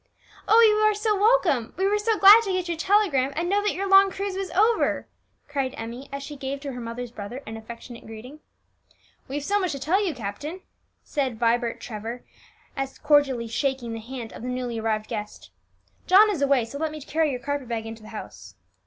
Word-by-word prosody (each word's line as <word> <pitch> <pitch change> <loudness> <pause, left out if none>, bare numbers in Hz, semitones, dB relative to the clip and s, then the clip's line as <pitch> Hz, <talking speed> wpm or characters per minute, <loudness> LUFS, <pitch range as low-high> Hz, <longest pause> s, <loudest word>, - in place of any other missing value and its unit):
"Oh, 445 - +6
you 430 -2 +6
are 430 0 +3
so 425 0 +1
welcome; 390 - +2
we 380 - +1
were 415 +1 +2
so 435 +1 +1
glad 410 +3 +9
to 410 -4 -3
get 370 -1 -1
your 340 - -1
telegram 325 -8 +2
and 335 +3 -1
know 400 +3 +2
that 420 - 0
your 395 +2 -2
long 390 0 +7
cruise 390 0 -4
was 385 0 -3
over!" 435 +4 +2 0.4
cried 275 -3 -2
Emmie 235 +4 -7
as 280 0 -5
she 295 +1 -8
gave 275 0 -4
to 280 -1 -5
her 245 -1 -7
mother's 235 +1 -6
brother 235 +5 -7
an 220 - -7
affectionate 230 +1 -10
greeting. 235 +7 -10 0.9
"We've 280 +2 -4
so 405 +6 +1
much 365 -5 -1
to 275 - -5
tell 360 +9 +1
you, 350 -7 -2
captain," 255 - -6 0.4
said 265 -5 -2
Vibert 235 +1 +1
Trevor, 230 +2 -6 0.8
cordially 285 -6 +3
shaking 250 0 -2
the 225 - -5
hand 235 0 -8
of - - -10
the 245 - -5
newly 250 -2 -3
arrived 215 -1 -1
guest. 210 -2 -7 0.6
"John 415 +3 +7
is 340 -8 -3
away, 275 -4 +3
so 280 +5 -8
let 320 0 -1
me 305 - -7
carry 310 +2 0
your 255 -3 -3
carpet 285 0 -3
bag 225 -1 -3
into 225 0 -8
the 215 - -12
house." 220 - -10
280 Hz, 205 wpm, -25 LUFS, 235-380 Hz, 0.9 s, glad